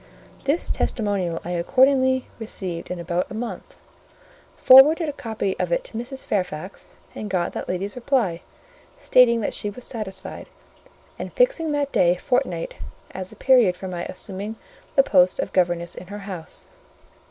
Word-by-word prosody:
This 290 +5 0
testimonial 195 -7 -1
I 175 - -4
accordingly 260 +8 +3
received 185 -6 -5
in 180 - -3
about 170 +1 -2
a - - -7
month, 235 +1 -6 0.8
forwarded 300 +6 +7
a 295 - -3
copy 220 -8 -3
of - - -1
it - - +1
to - - -10
Mrs. 250 +4 -5
Fairfax, 185 -2 -3 0.3
and 210 - -6
got 180 -2 -1
that - - -5
lady's 195 +3 -3
reply, 235 -9 0 0.6
stating 235 -2 +4
that - - -2
she 205 - -2
was 240 +5 -10
satisfied, 190 -6 -6 0.7
and - - -5
fixing - - +2
that 285 -1 -1
day 175 0 +4
fortnight 180 -5 -1 0.3
as 185 -1 -6
the - - -12
period 240 -9 +4
for 190 - -6
my 175 -2 -4
assuming 200 +3 -6 0.4
the 275 - +6
post 185 -6 +4
of - - -3
governess 175 -2 +1
in 180 - -10
her 205 +2 -7
house. 180 -5 -8
205 Hz, 155 wpm, -23 LUFS, 180-260 Hz, 0.8 s, forwarded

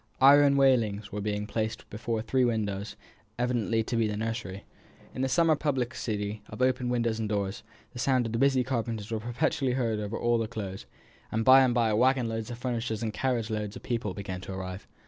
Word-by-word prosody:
Iron 140 +1 +7
railings 110 -7 +2
were 105 0 -4
being 105 0 -2
placed 110 +1 -3
before 110 +1 -3
three 130 +3 +1
windows, 105 -4 -1 0.4
evidently 120 -2 0
to 120 - -3
be 115 -1 +2
the 105 -1 -3
nursery. 110 -3 -4 0.5
In 130 - -4
the 135 - +1
summer 160 +4 +4
publicity 120 -7 -2
of - - -9
open 125 -1 +1
windows 115 -2 0
and 110 -2 -2
doors, 100 0 -2 0.3
the 125 - -8
sound 130 -1 +2
of 115 - -3
the 115 - -1
busy 135 -1 +3
carpenters 115 -4 -3
was 110 -1 -2
perpetually 130 +3 0
heard 115 -4 0
all 120 +1 0
over 115 -1 +2
the - - -6
Close: 100 -4 -6 0.4
and 110 +1 -1
by 130 +1 +9
and 125 -3 +3
by 115 -3 +2
waggon 125 +2 +3
loads 115 0 -4
of 120 - -6
furniture 120 -2 -2
and 110 -2 -3
carriage 120 -3 -1
loads 105 -1 -3
of - - -10
people 115 -6 -2
began 95 -2 -5
to 95 - -7
arrive. 95 0 -6
115 Hz, 205 wpm, -28 LUFS, 105-125 Hz, 0.5 s, by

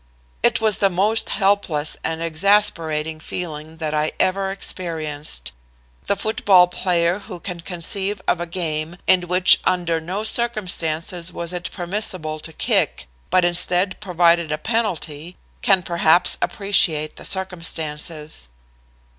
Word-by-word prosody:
"It 235 -1 +2
was 220 -2 +2
the 195 - +4
most 205 +5 +2
helpless 195 -7 0
and 165 0 -3
exasperating 160 -3 +2
feeling 155 -1 -6
that 155 -2 -3
I 150 0 0
ever 190 +1 +1
experienced. 155 - -2 0.6
The - - +2
football 200 -3 +4
player 180 0 0
who 195 -3 -10
can 180 -1 -6
conceive 190 +4 -2
of 175 - +1
a 175 - -3
game 165 -1 -3
in 180 -1 +3
which 180 +1 +5
under 170 -3 0
no 185 +6 -4
circumstances 180 -7 -1
was 170 0 -5
it 180 0 -4
permissible 175 -4 +1
to 160 - -8
kick, 65 - 0 0.2
but 185 -1 +3
instead 180 +2 +1
provided 170 -4 +2
a 150 - -1
penalty, 175 -6 -3 0.2
can 190 -3 +3
perhaps 170 0 +3
appreciate 170 -7 +1
the - - -10
circumstances. 160 - -3
175 Hz, 130 wpm, -21 LUFS, 160-195 Hz, 0.6 s, which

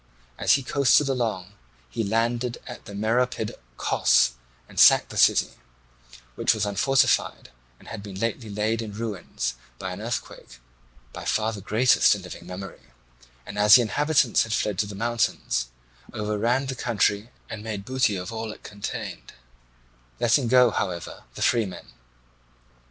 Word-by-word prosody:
As - - +4
he 135 - +2
coasted 140 +2 +3
along 110 -7 -2 0.3
he 85 - -3
landed 115 +3 -1
at 120 - -10
the 100 - -9
Meropid 110 +1 0 0.2
Cos - - +3 0.4
and - - -7
sacked - - +7
the - - -9
city, - - +4 0.8
which 110 - +2
was 105 -1 -1
unfortified 130 - +1 0.3
and - - -19
had 110 - -7
been 100 -2 -8
lately 115 0 -3
laid 105 +2 -1
in 110 -2 -7
ruins 105 - -4 0.2
by - - -5
an - - -7
earthquake, - - -6 0.6
by - - -7
far 110 +1 0
the 100 - -7
greatest 110 +3 +4
in 100 - -9
living 90 -1 -10
memory, 95 +2 -8 0.6
and, 100 - -6
as 105 +2 +8
the 125 - +6
inhabitants 140 +2 +2
had 110 - -2
fled 105 -3 -1
to 105 - +1
the 100 - -8
mountains, 105 - -1 0.5
overran 110 +5 0
the 130 - -3
country 110 -3 0 0.2
and 110 -3 -7
made 105 -3 -5
booty 130 -5 +1
of 90 +3 -5
all 110 -1 -4
it - - -13
contained, 105 0 -7 0.9
letting 120 +2 +3
go, 125 0 +5
however, 85 -4 -4
the - - -3
free 115 -4 +2
men. 95 - -10
110 Hz, 155 wpm, -25 LUFS, 100-120 Hz, 0.9 s, as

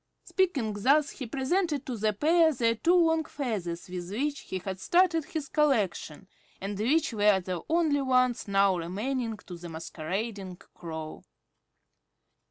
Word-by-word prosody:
'" - - -52
Speaking 300 - 0
thus, 280 +8 +3
he 260 - -7
presented 285 - 0
to 255 - -4
the 215 0 +1
pair 320 - +4
their 230 -5 +1
two 335 +10 +2
long 325 -2 +3
feathers 205 - -4
with 180 -1 -6
which 280 +7 -2
he 190 - -5
had 190 +1 -5
started 345 - +3
his 310 -3 -4
collection 210 - 0 0.3
and 195 +1 -5
which 285 +5 +2
were 205 -2 +4
the 180 -2 -4
only 315 -4 +2
ones 255 -3 +2
now 195 -1 +3
remaining 220 +7 -3
to 180 - -8
the 170 0 -9
masquerading 185 +5 -5
Crow. 160 -3 -8
230 Hz, 150 wpm, -28 LUFS, 190-295 Hz, 0.3 s, pair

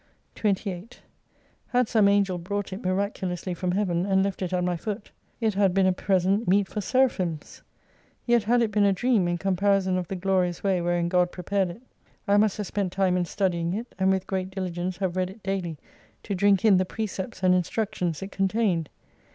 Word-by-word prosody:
28 200 0 -2 0.7
Had 250 -2 +2
some 215 -3 +4
Angel 200 -3 +2
brought 200 +2 -4
it 195 - -7
miraculously 185 -1 -2
from 180 +1 -2
heaven, 180 -3 0
and 190 0 +2
left 195 0 -3
it 185 -1 -2
at 180 -1 0
my 180 0 0
foot, 205 +4 -5 0.3
it 220 -3 +1
had 195 -2 +2
been 195 -1 +4
a 185 - +3
present 190 +3 +1
meet 195 +2 +3
for 215 - -5
'i8o - - -3
Seraphims. 190 - 0 0.6
Yet 240 -1 +4
had 240 +2 +3
it 220 - -1
been 205 0 +2
a 200 - +4
dream 215 -2 +2
in 175 0 0
comparison 195 0 +1
of 180 - -5
the 195 - -4
glorious 180 -2 0
way 190 -3 +1
wherein 175 0 0
God 180 0 +2
prepared 190 +1 -1
it. 175 +7 -9 0.5
I 200 0 +4
must 210 -1 +3
have 210 - -3
spent 195 -1 -2
time 190 -1 +1
in 180 -1 +1
studying 175 -2 -1
it, 235 +3 -6
and 190 0 +3
with 190 -1 +1
great 190 -1 -2
diligence 185 -1 -4
have 185 -2 -2
read 185 -1 0
it 200 +3 -13
daily 185 -5 -3 0.5
to 205 - -3
drink 200 +1 +3
in 205 -4 +6
the 185 - +3
precepts 190 -1 -5
and 185 0 +5
instruc 205 +4 -1
tions 175 -4 -2
it 195 - -7
contained. 195 -5 0
190 Hz, 205 wpm, -26 LUFS, 180-205 Hz, 0.7 s, in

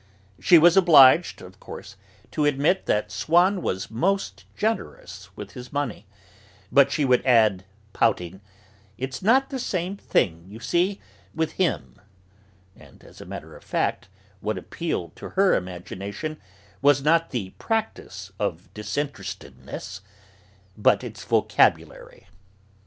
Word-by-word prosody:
She 175 - +6
was 170 +1 +6
obliged, 165 -3 +6
of 90 0 -14
course, - - -10 0.4
to 150 - -1
admit 145 +6 +1
that 105 -1 0
Swann 175 - +2
was 95 - -3
most 115 - -1
generous 225 - -4
with - - -8
his 125 -1 -10
money, 140 -8 -3 0.6
but 140 0 +5
she 145 0 +1
would 125 -1 +3
add, 110 -7 +3 0.3
pouting: 95 -4 0 0.6
"It's 130 +2 -5
not 260 +8 +3
the 265 - -3
same 185 -4 -3
thing, 85 - 0
you 105 +3 -11
see, 180 +9 0 0.4
with 160 -1 -1
him," 180 -2 -2 0.7
and, - - -18
as - - -15
a - - -11
matter - - -9
of - - -15
fact, - - -2 0.3
what 105 0 -3
appealed 95 - -4
to - - -8
her 195 -1 +5
imagination 95 - -5 0.4
was 140 0 +4
not 165 +2 +3
the 100 -7 -4
practice 220 - -3
of 90 -4 -4
disinterestedness, 100 -4 -6 0.7
but 105 - +3
its - - -8
vocabulary. - - +1
135 Hz, 130 wpm, -24 LUFS, -, 0.7 s, She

